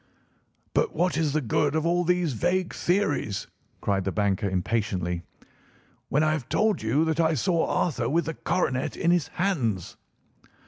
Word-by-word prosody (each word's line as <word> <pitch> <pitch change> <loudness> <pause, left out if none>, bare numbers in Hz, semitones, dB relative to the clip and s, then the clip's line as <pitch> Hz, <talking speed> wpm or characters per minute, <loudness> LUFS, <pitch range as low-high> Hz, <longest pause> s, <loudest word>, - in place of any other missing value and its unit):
"But 465 - +1
what 180 -4 +1
is 155 -2 +1
the 155 - +1
good 145 +5 +1
of 160 0 0
all 175 +1 +2
these 180 -4 +1
vague 175 +8 0
theories," 175 - 0 0.4
cried 100 -2 0
the 95 - -1
banker 100 -1 0
impatiently, 90 -2 -1 0.9
"when 150 +3 +2
I 155 - +3
have 150 -6 -3
told 215 -1 +2
you 125 +9 +2
that 160 0 -1
I 160 -1 +3
saw 165 +5 +1
Arthur 125 -8 0
with 170 +4 +1
the 160 - -3
coronet 130 -6 -1
in 170 - +2
his 175 -3 +2
hands?" 125 - -1
155 Hz, 165 wpm, -26 LUFS, 110-175 Hz, 0.9 s, I